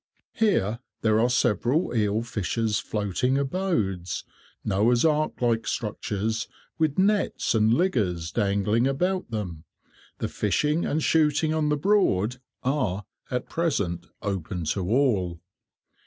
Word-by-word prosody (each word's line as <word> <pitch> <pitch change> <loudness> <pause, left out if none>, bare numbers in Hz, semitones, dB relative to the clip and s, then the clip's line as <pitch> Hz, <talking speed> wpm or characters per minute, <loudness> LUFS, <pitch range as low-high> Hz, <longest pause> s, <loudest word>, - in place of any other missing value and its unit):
Here 115 - +1 0.2
there 110 -1 +3
are 120 +2 +3
several 125 - +1
eel 105 0 +1
fishers' 110 0 -1
floating 105 +6 0
abodes, 130 - -1 0.4
Noah's 110 +6 +3
ark 155 -1 +1
like 115 -2 +1
structures, 110 +1 -2 0.3
with 155 -3 +1
nets 205 +2 +2
and 110 -1 +3
"liggers" 105 - +1
dangling 105 +4 +2
about 180 +6 0
them. 90 -8 -4 0.5
The - - -2
fishing 150 - 0
and 155 +1 0
shooting 155 0 +3
on 155 -1 +1
the 150 - +2
Broad 135 - +2 0.2
are, 125 -8 0 0.2
at 125 -1 -2
present, 100 - -1 0.2
open 95 -3 -3
to 90 +3 -1
all. 105 - +1
115 Hz, 120 wpm, -26 LUFS, 100-150 Hz, 0.5 s, there